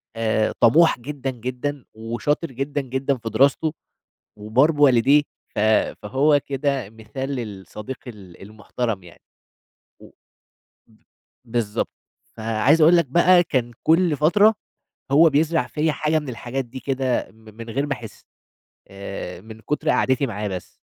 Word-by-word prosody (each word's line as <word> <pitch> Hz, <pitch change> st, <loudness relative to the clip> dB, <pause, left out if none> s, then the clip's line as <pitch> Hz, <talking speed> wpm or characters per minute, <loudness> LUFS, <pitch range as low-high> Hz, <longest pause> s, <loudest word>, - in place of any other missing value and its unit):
آآ 110 Hz, -1 st, 0 dB
طَموح 150 Hz, +4 st, +5 dB
جدًا، 135 Hz, +1 st, -5 dB
جدًا 130 Hz, +3 st, -5 dB
وشاطر 120 Hz, +8 st, -2 dB
جدًا، 140 Hz, +3 st, -3 dB
جدًا 130 Hz, +1 st, -2 dB
في 115 Hz, -1 st, -6 dB
دراسته، 140 Hz, +7 st, +2 dB, 0.6 s
وبار 120 Hz, +9 st, +2 dB
بوالديه، 145 Hz, 0 st, +4 dB, 0.3 s
ف -, -, -2 dB, 0.4 s
فهو 145 Hz, +6 st, +3 dB
كده 135 Hz, -5 st, -2 dB
مثال 110 Hz, +5 st, -7 dB
للصديق 105 Hz, 0 st, -6 dB
ال 95 Hz, -7 st, -12 dB
المحترم 105 Hz, 0 st, -4 dB
يعني. 85 Hz, -, -16 dB, 0.8 s
و -, -, -15 dB, 0.8 s
م 110 Hz, -, -25 dB, 0.5 s
بالضبط. 115 Hz, -3 st, -2 dB, 0.5 s
فعايز 115 Hz, +8 st, +2 dB
أقول 170 Hz, +3 st, +7 dB
لك 170 Hz, -, +2 dB
بقى 175 Hz, +5 st, +5 dB
كان 125 Hz, -6 st, -1 dB
كل 165 Hz, -1 st, +3 dB
فترة 205 Hz, +8 st, +4 dB, 0.6 s
هو 160 Hz, +3 st, +6 dB
بيزرع 150 Hz, -3 st, +1 dB
فيّا 155 Hz, +2 st, 0 dB
حاجة 155 Hz, +1 st, 0 dB
من 145 Hz, -3 st, -8 dB
الحاجات 125 Hz, +2 st, -4 dB
دي 130 Hz, +2 st, -9 dB
كده 130 Hz, -1 st, -1 dB
م -, -, -26 dB, 0.2 s
من 115 Hz, 0 st, -9 dB
غير 140 Hz, +5 st, -1 dB
ما 135 Hz, -, 0 dB
أحس 120 Hz, -4 st, -11 dB, 0.6 s
آآ 95 Hz, -2 st, -7 dB
من 110 Hz, +1 st, -12 dB
كُتر 150 Hz, +6 st, -1 dB
قعدتي 130 Hz, +1 st, +2 dB
معاه 105 Hz, -2 st, -4 dB
بس. 90 Hz, -2 st, -6 dB
130 Hz, 140 wpm, -22 LUFS, 110-145 Hz, 0.8 s, أقول